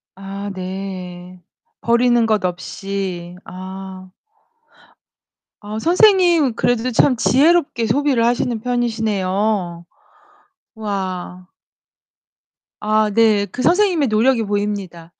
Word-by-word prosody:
아 195 +1 -7
네. 185 -1 -7 0.4
버리는 235 0 +3
것 215 -3 +1
없이. 180 -1 -5
아. 185 0 -9 1.5
아 210 +1 -6
선생님 345 - +4
그래도 245 +1 0
참 250 +3 +3
지혜롭게 280 -1 +2
소비를 250 0 +1
하시는 240 -1 0
편이시네요. 210 -6 -1 0.9
와. 185 -4 -5 1.3
아, 215 0 +1
네. 215 -2 +3
그 255 - -5
선생님의 360 -6 +3
노력이 230 +2 +2
보입니다. 200 -5 -4
210 Hz, 185 characters per minute, -19 LUFS, 185-240 Hz, 1.5 s, 선생님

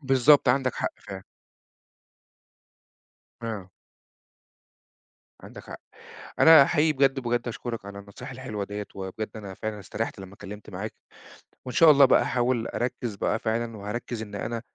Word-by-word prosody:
بالضبط 135 0 +4
عندك 130 0 +2
حق - - -1
فعلًا. 95 -1 -9 2.2
آه. 105 -5 -5 1.7
عندك - - -11
حق. - - -10 0.6
أنا 160 -3 +9
حقيقي 155 +1 +2
بجد، 135 -1 +2
بجد 120 -1 -1
أشكُرَك 115 -3 -6
على 100 0 -8
النصايح 100 +7 -10
الحلوة 125 -6 -5
دِيَّة، 105 +1 -6
وبجد 95 +3 -5
أنا 100 -3 -8
فعلًا 110 +1 -5
استريَّحت 110 +2 -4
لمّا 95 0 -10
اتكلمت 105 0 -10
معاك. 100 +3 -6 0.7
وإن 125 -2 -6
شاء 165 -2 +8
الله 140 -1 +7
بقى - - +5
أحاول 120 -1 0
أركِّز 120 -3 -3
بقى 105 +2 -1
فعلًا 115 0 -2
وهاركِّز 110 +3 -5
إن 105 -2 -8
أنا، 115 +3 -4
115 Hz, 140 wpm, -26 LUFS, 105-130 Hz, 2.2 s, أنا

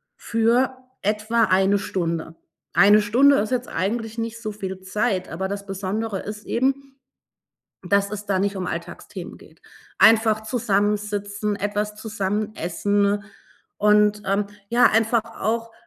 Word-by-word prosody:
für 235 +3 +1 0.2
etwa 215 +3 +1
1 195 +1 +3
Stunde. 165 -4 -3 0.4
1 205 +3 +6
Stunde 265 +7 +5
ist 210 +1 0
jetzt 255 0 -1
eigentlich 225 +5 -2
nicht 230 0 -4
so 215 - -4
viel 190 -2 -6
Zeit, 190 0 -1
aber 190 +3 -3
das 200 0 -5
Besondere 195 +2 -3
ist 210 +2 -7
eben, 270 +2 -1 0.8
dass 200 +2 +1
es 210 0 -5
da 195 -2 0
nicht 200 +1 -1
um 180 -1 -3
Alltagsthemen - - -7
geht. - - -19 0.4
Einfach 220 -1 +5
zusammensitzen, 205 -2 -1
etwas 210 +1 -2
zusammen 210 0 -3
essen 200 +4 0 0.5
und, 210 0 +3
ähm, 200 +1 0 0.2
ja, 240 +1 +4
einfach 225 0 +2 0.2
auch 230 +2 -1
210 Hz, 130 wpm, -23 LUFS, 200-225 Hz, 0.8 s, 1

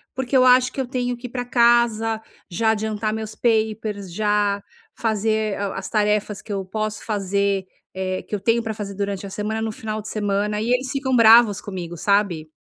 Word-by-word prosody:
porque 265 0 -2
eu 255 - +6
acho 250 0 +5
que 270 - -2
eu 250 - -4
tenho 245 -1 -2
que 245 +1 -8
ir - - -13
pra 245 0 -4
casa, 235 -2 +3 0.3
já 220 +5 +2
adiantar 215 0 -2
meus 220 0 -5
papers, 215 -4 -1
já 205 -1 +1 0.4
fazer 220 -1 0
a 200 -1 -3
as 195 - -5
tarefas 210 -1 0
que 210 - -10
eu 195 -1 -2
posso 215 +2 -4
fazer, 200 -2 0 0.3
eh, 185 0 -3
que 210 - -4
eu - - -3
tenho 230 +3 +2
pra 220 - -3
fazer 205 -2 -6
durante 200 -1 -3
a - - -6
semana, 215 +3 -3
no 220 -1 -2
final 215 0 -5
de 215 - -8
semana, 210 0 -1
e 230 - -2
eles 255 +1 -1
ficam 270 -2 0
bravos 225 -2 +7
comigo, 175 -4 -6
sabe? 180 -4 +1
215 Hz, 200 wpm, -22 LUFS, 200-230 Hz, 0.4 s, bravos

